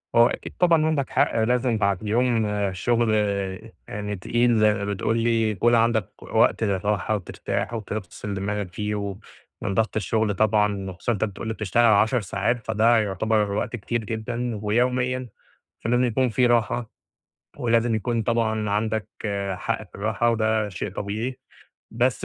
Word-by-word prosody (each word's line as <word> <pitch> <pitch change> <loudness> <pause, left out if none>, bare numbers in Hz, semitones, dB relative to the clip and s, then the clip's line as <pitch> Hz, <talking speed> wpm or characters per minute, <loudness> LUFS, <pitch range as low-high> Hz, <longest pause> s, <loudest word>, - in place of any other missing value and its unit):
آه، 120 +1 +7
أكيد - - -7
طبعًا 165 -3 +4
عندك 150 -4 0
حق - - +2
لازم 125 0 +1
بعد 100 -1 0
يوم 115 0 +1 0.3
شُغل 115 +5 +1 0.8
يعني 105 0 -4
تقيل 120 +4 +1
زي 105 0 +5
ما 100 -1 -3
بتقول 100 +3 -1
لي، 115 -1 +2
يكون 120 +4 +3
عندِك 115 -3 +2
وقت - - +2
للراحة 100 +1 0
وترتاح 100 +4 -3
وتفصِل 105 -2 -5
دماغك 100 -1 -3
فيه، 105 +2 -2
ومن 100 0 -6
ضغط 110 +3 0
الشغل 110 0 0
طبعًا، 105 -2 +1
وخصوصًا 95 +6 -3
إن - - +1
أنت - - +3
بتقول 110 +1 -4
لي 110 - -1
بتشتغل 110 +2 +1
10 110 +3 +4
ساعات 105 +4 -1
فده 110 +2 +3
يُعتبر 105 +1 0
وقت 110 +4 -2
كتير 120 +1 -3
جدًا، 115 +1 -3
ويوميًا 125 +3 0 0.5
فلازم 120 +2 +2
يكون 125 +1 +1
في 125 +2 +2
راحة 120 -1 +1 0.7
ولازم 115 -1 +2
يكون 115 +1 -1
طبعًا 110 -2 0
عندك 110 0 -1 0.5
حق 110 - -2
في - - -13
الراحة 110 +3 0
وده 110 -2 +1
شيء 95 +1 -5
طبيعي، 110 +6 -4 0.5
بس 125 +2 0
110 Hz, 150 wpm, -24 LUFS, 105-120 Hz, 0.8 s, آه